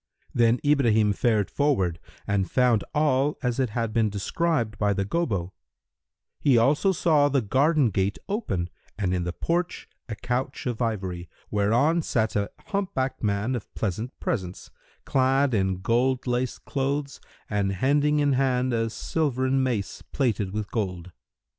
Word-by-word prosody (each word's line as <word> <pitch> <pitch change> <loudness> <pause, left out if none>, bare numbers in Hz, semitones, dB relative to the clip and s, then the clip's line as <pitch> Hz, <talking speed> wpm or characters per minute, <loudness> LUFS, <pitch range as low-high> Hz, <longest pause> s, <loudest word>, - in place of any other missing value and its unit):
Then 120 0 +3
Ibrahim 115 -8 +3
fared 110 -1 +1
forward 95 - +1 0.3
and 100 -2 0
found 125 -5 +3
all 145 -1 +2
as 125 0 0
it 130 -3 +1
had 115 0 -2
been 110 -2 +2
described 115 - -1
by 105 -1 +2
the 100 0 -1
Gobbo: 100 - -1 0.9
he 135 -4 +4
also 145 - +3
saw 155 -5 +3
the 140 -1 +2
garden 135 +3 +3
gate 95 +1 0
open, 95 - -2 0.3
and 95 -3 0
in 90 -1 -1
the 90 - -2
porch 170 - -2 0.2
a 110 - -3
couch 125 +4 -3
of 125 -2 -3
ivory, 95 -6 -2 0.2
whereon 120 +11 +2
sat 110 -7 0
a 100 -1 0 0.2
hump 200 -2 -2
backed 130 0 -1
man 105 +3 0
of 120 -5 -5
pleasant 110 +5 -3
presence, 95 -5 -4 0.3
clad 135 0 +2
in 95 -3 0
gold 125 +4 +1
laced 125 0 -2
clothes 140 +1 -2 0.3
and 100 -2 0
hending 145 +8 +2
in 145 -1 +3
hand 130 -1 +1
a 115 -1 0
silvern 130 +2 0
mace 120 -6 -2
plated 110 -8 0
with 105 0 -4
gold. 90 -5 -3
120 Hz, 150 wpm, -26 LUFS, 100-135 Hz, 0.9 s, he